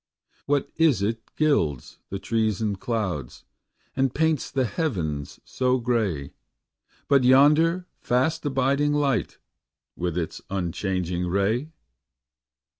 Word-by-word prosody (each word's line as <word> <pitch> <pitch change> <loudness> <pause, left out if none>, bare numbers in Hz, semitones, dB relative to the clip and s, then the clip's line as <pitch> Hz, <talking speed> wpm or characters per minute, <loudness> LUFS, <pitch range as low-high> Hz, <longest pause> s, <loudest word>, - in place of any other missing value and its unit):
What 145 -1 0
is 150 - +3
it 115 +2 -1
gilds 80 - 0
the 100 - -3
trees 110 -1 0
and 105 -3 -2
clouds, 95 - -3 0.5
And 135 -1 +1
paints 160 -2 +1
the 135 -2 0
heavens 90 - -3
so 130 0 +1
gay, 110 - -1 0.7
But 140 -2 +4
yonder 150 +7 +5
fast 145 +7 0
abiding 140 +1 +1
light 140 -8 0 0.6
With 90 -1 -2
its 85 -2 -3
unchanging 90 -1 -2
ray? 100 - 0
120 Hz, 110 wpm, -25 LUFS, 95-140 Hz, 0.7 s, yonder